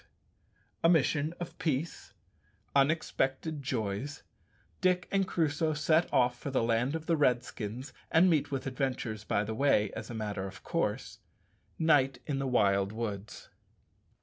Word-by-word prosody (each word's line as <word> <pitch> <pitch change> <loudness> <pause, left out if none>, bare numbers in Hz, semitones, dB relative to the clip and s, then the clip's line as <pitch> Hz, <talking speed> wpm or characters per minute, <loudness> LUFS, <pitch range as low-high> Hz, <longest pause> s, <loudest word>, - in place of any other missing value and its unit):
_A 165 - +6
mission 155 0 +2
of 175 0 -7
peace 145 - -2 0.6
Unexpected 140 0 +1
joys 130 +3 -3 0.6
Dick 180 -1 +2
and 195 -1 +2
Crusoe 155 -2 0
set 155 +2 +2
off 125 -1 +2
for - - -5
the 130 -3 +1
land 120 +5 +1
of 160 -1 -5
the 165 - +2
Redskins, 125 -2 -1 0.2
and 165 +3 +5
meet 160 -5 +2
with 135 -2 -3
adventures 130 -5 -2
by 105 -1 0
the 110 +1 -4
way 110 -5 +2
as - - -7
a 120 - -6
matter 105 -3 -3
of 95 -1 -11
course - - -2 0.6
Night 145 -5 +3
in 140 -3 -2
the 135 - -1
wild 100 -5 +2
woods_. 105 -3 -5
135 Hz, 145 wpm, -31 LUFS, 115-155 Hz, 0.6 s, A